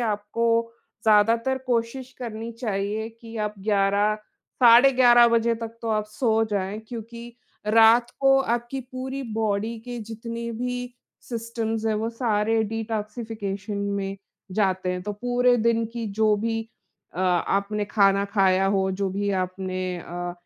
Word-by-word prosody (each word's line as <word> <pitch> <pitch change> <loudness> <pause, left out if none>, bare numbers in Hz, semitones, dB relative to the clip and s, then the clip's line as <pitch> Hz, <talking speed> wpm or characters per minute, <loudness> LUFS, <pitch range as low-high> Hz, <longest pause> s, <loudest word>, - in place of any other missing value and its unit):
आपको 215 +1 -1 0.6
ज़्यादातर 230 +4 +3
कोशिश 250 +2 -2
करनी 230 -2 -5
चाहिए 215 -2 -3
कि 230 0 -12
आप 210 - -6
11, 200 +1 +2 0.5
साढ़े 245 +3 +8
11 240 -2 +6
बजे 230 0 +2
तक 230 0 -7
तो 230 - -3
आप 215 -1 +1
सो 225 0 +1
जाएँ, 200 0 -2
क्योंकि 235 0 -8 0.3
रात 225 +2 +5
को 270 0 +5
आपकी 240 +1 -2
पूरी 260 +1 -4
बॉडी 220 +1 -1
के 245 -1 -6
जितने 230 +1 -6
भी 245 +1 -4 0.3
सिस्टम्स 230 -1 -3
हैं, 220 - +1
वो 220 +2 -1
सारे 225 -2 +1
डिटॉक्सिफिकेशन 215 -2 -4
में 200 -1 -2 0.4
जाते 190 -2 0
हैं। 180 0 -4
तो 210 +2 -4
पूरे 245 +3 +2
दिन 230 0 +2
की 235 -2 -4
जो 215 -1 +5
भी 225 +2 -1 0.5
अ, 180 - -4
आपने 200 +3 +1
खाना 200 -1 +3
खाया 195 -2 +2
हो, 195 -1 +1
जो 195 +1 -1
भी 200 +2 -1
आपने 185 0 -4 0.2
अ 175 +1 -5
220 Hz, 140 wpm, -24 LUFS, 200-235 Hz, 0.6 s, साढ़े